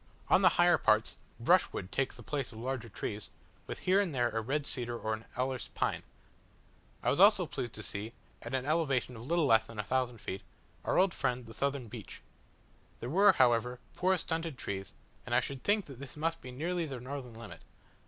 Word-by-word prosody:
On - - +6
the - - +8
higher - - +6
parts, - - +3 0.2
brushwood 90 - +2
takes 135 -1 0
the - - -12
place 140 -4 -3
of 110 - -11
larger 120 0 -3
trees, 105 +2 -5 0.4
with - - -4
here 185 +2 +3
and 175 -8 -2
there 120 -1 +2
a 115 - -1
red 140 +6 -1
cedar 120 -4 -2
or 110 -1 -2
an 110 +1 -6
alerce 130 0 -1
pine. - - 0 1.0
I - - +3
was - - 0
also - - +7
pleased 120 -2 -4
to 110 - -6
see, 105 +3 -4 0.3
at 115 +3 -4
an 130 0 -1
elevation 140 -5 +1
of 110 - -8
a - - -9
little 170 +2 +2
less 110 -4 +4
than 115 - -10
1000 125 +3 0
feet, 95 -3 -5 0.4
our - - +1
old 185 0 +4
friend 125 -1 -1
the 115 - -10
southern 140 -1 -1
beech. 110 -1 -9 0.8
They - - -6
were, 185 +11 +6
however, 120 +1 +3
poor 185 +1 +2
stunted 165 -4 -2
trees, 95 -1 -5 0.3
and 120 - -1
I - - +7
should 130 +1 -4
think 205 -1 +2
that 135 -4 -11
this 140 +1 -8
must 165 +2 -1
be 130 - -8
nearly 165 +6 -2
their 135 -3 -5
northern 125 -2 -6
limit. 115 -2 -10
125 Hz, 205 wpm, -32 LUFS, 115-145 Hz, 1.0 s, the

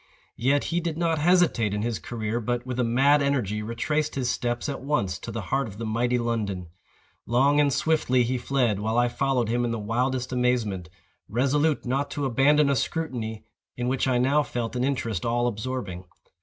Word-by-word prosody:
Yet 135 +4 +2
he 175 - +2
did 165 -2 -3
not 165 -2 +1
hesitate 155 - +3
in 105 - -2
his 115 -1 -2
career, 115 -1 -3
but, 120 +1 -2
with 130 -1 -4
a - - +3
mad 135 +5 +4
energy, 120 -7 0
retraced 150 +8 -1
his 125 -3 0
steps 120 +2 -2
at 140 - -4
once, 100 - -1
to 115 - -7
the 110 0 -4
heart 135 -2 +1
of 100 -2 -10
the 115 - -4
mighty 120 +3 +1
London. 105 -7 -2 0.6
Long 135 +5 +3
and 145 -1 +4
swiftly 130 -4 +2
he 125 +1 -1
fled, 120 -5 +1
while 110 +2 -1
I 120 0 +4
followed 125 -1 0
him 120 +1 +1
in 120 - 0
the 115 - -2
wildest 125 +4 -1
amazement, 115 -9 0 0.4
resolute 140 +7 +1
not 135 +3 -1
to 145 - 0
abandon 140 +3 +4
a 140 - +2
scrutiny 120 -8 -3 0.3
in 125 0 -2
which 130 +1 0
I 130 -1 +2
now 135 +4 +3
felt 120 -4 -4
an 125 - 0
interest 115 -8 -1
all 120 +1 +1
absorbing. 110 -5 -4
125 Hz, 195 wpm, -26 LUFS, 115-140 Hz, 0.6 s, mad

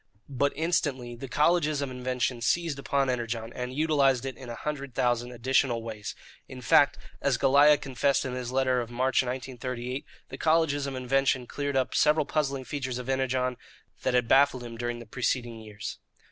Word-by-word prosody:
But 140 +1 +1
instantly 140 -7 -1
the 135 +3 -7
colleges 150 +2 +2
of 140 -2 -3
invention 125 -1 -2
seized 150 +5 0
upon 140 0 0
Energon 115 -2 -3
and 125 0 -4
utilized 140 -3 +2
it 135 -2 -4
in 125 0 -10
a 120 - -5
hundred 140 -2 -5
thousand 120 0 +1
additional 125 -1 +1
ways. 110 -2 -6 0.3
In - - -9
fact, - - +4 0.2
as - - +2
Goliah 145 +2 +6
confessed 135 +1 0
in 130 - -3
his 125 -1 -4
letter 130 -1 +2
of 115 - -6
March 130 +2 +2
1938, 125 0 -4 0.3
the 135 - -8
colleges 155 -3 +2
of 135 - -4
invention 130 0 +1
cleared 140 +1 -2
up 130 - 0
several 150 0 +3
puzzling 140 -3 -1
features 130 -2 -3
of 125 +1 -6
Energon 130 -1 0 0.4
that 125 - 0
had 125 -1 +2
baffled 135 -1 +4
him 120 -1 -7
during 120 +1 -3
the 120 - -9
preceding 120 0 -2
years. 105 -2 -7
130 Hz, 175 wpm, -28 LUFS, 120-140 Hz, 0.4 s, Goliah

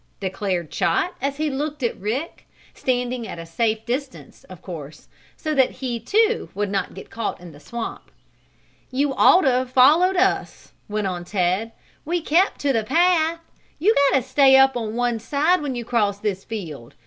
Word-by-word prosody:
declared 190 -3 -3
Chot, 360 - 0
as 275 +1 -2
he 305 -1 -1
looked 290 +1 -4
at 235 - 0
Rick 250 - -4 0.3
standing 245 -2 -2
at - - -7
a 165 - -7
safe 220 +5 -1
distance, 260 +3 -5
of - - -12
course, - - -9 0.3
so 310 -1 -2
that 265 -3 +4
he, 250 -3 -4
too, 440 - +1
would 205 0 -2
not 195 -2 -2
get - - -11
caught 225 -1 -3
in 175 -1 -11
the 145 - -15
swamp. 230 +10 -7 0.8
"You 275 +2 0
ought 360 - +6
to 270 - +3
have 255 0 0
followed 305 +9 +5
us," 370 - 0 0.2
went 210 0 -2
on 180 -2 -3
Ted. 185 +4 -1 0.3
"We 345 +3 -1
kept 340 +4 +2
to 280 -1 +1
the 225 -2 +1
path. 330 +4 +2 0.4
You 400 +9 +3 0.2
got - - +3
to 260 - -1
stay 265 +1 +5
up 270 0 +5
on 225 -2 -3
one 240 -1 0
side 300 +9 +1
when 280 -3 -3
you 240 -1 -5
cross 210 -4 +1
this 200 -2 -3
field. 160 - -7
250 Hz, 185 wpm, -22 LUFS, 210-290 Hz, 0.8 s, ought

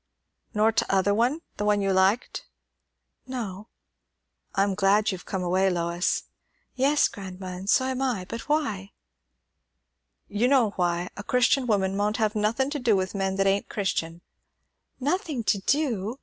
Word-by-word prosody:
"Nor 215 +1 +4
t'other 200 -2 +2
one? 245 +9 +1 0.2
the - - -2
one 210 0 +3
you 195 -1 +1
liked." 190 +5 +1 0.8
"No." 215 -6 -5 0.9
"I'm 195 0 +2
glad 205 +2 +3
you've 185 -2 -8
come 190 -2 -2
away, 185 +2 +2
Lois." 170 0 0 0.5
"Yes, 280 +3 +3
grandma, 190 -1 -8
and 190 +2 -6
so 260 - +4
am 260 0 -2
I; 240 -9 -1
but 230 +7 -7
why?" 215 -11 -1 1.3
"You 215 +4 +1
know 255 -6 +4
why. 175 -1 -1
A 205 - -6
Christian 250 +3 +2
woman 195 -3 +1
maunt 210 +2 0
have 215 -2 +1
nothin' 225 +6 0
to 295 - -2
do 235 -5 +3
with 185 -1 -1
men 195 -1 -1
that 195 0 +1
ain't 195 +1 +1
Christian." 170 -4 -2 0.8
"Nothing 295 - -1
to 205 - +1
do! 235 -2 0
205 Hz, 150 wpm, -26 LUFS, 190-245 Hz, 1.3 s, Nor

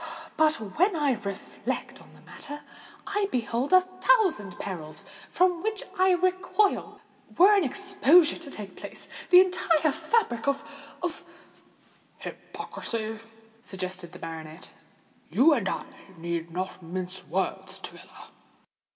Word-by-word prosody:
"But 310 0 +4
when 325 - +1
I 295 -3 +2
reflect 200 -5 -4
on - - -18
the - - -18
matter, 290 +1 -7 0.4
I 405 -1 0
behold 240 +2 -1
a 370 0 +8
thousand 370 - +2
perils 160 -6 -5 0.2
from 360 -2 +2
which 430 0 -2
I 375 -1 +4
recoil. 370 +3 +1 0.4
Were 395 +4 +8
an 395 - +4
exposure 355 0 +4
to 330 -4 -6
take 210 -7 -5
place, - - -9 0.2
the 360 -1 +10
entire 335 -4 +2
fabric 315 - 0
of—of——" 285 +4 -4 0.9
"Hypocrisy," 220 -1 -5 0.4
suggested 185 -4 -5
the - - -10
baronet. 160 +1 -8 0.6
"You 300 +6 +5
and 225 -9 0
I - - -3 0.3
need 170 0 -3
not 185 +2 -4
mince 180 +2 -6
words 190 +2 -2
together." - - -11
285 Hz, 120 wpm, -27 LUFS, -, 0.9 s, the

